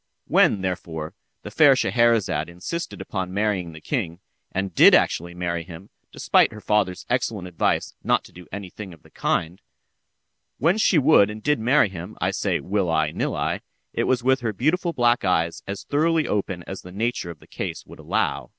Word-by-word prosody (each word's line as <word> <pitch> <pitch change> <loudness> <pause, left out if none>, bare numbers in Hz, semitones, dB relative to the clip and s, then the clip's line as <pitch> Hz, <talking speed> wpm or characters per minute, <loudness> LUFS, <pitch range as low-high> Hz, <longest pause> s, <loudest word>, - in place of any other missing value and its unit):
When, 100 - +3
therefore, 85 -3 -4 0.3
the 105 - -8
fair 140 +3 +6
Scheherazade 115 -10 +2
insisted 130 - -5
upon 95 -2 -4
marrying 100 -5 0
the 80 - -11
king, 90 - -3 0.3
and 95 -1 -3
did - - +8
actually 85 +1 +1
marry 85 -1 -2
him 85 +3 -12 0.2
despite - - +3
her 110 - -9
father's 105 -4 0
excellent 115 -6 -1
advice 90 - -1
not - - +2
to - - -16
do 90 -1 -13
any 100 -2 -7
thing 95 -5 -9
of 80 - -28
the - - -20
kind—when 130 - -4
she 190 - +4
would 140 -8 +5
and 105 0 -8
did 150 -2 +2
marry 125 0 +3
him, 90 +3 -8
I - - 0
say, - - -1
will 95 -2 -1
I, 80 -2 +1
nill - - -2
I, - - -2 0.3
it - - 0
was 125 -2 +1
with 130 +1 +3
her 115 -3 -2
beautiful 165 - 0
black 120 -5 +2
eyes 85 -3 0
as 100 0 -5
thoroughly 160 +2 +1
open 95 -4 -2
as 95 - -7
the 90 - -12
nature 110 -2 -2
of 85 - -8
the - - -18
case - - -6
would - - -14
allow. - - -1
100 Hz, 185 wpm, -23 LUFS, 90-120 Hz, 0.3 s, did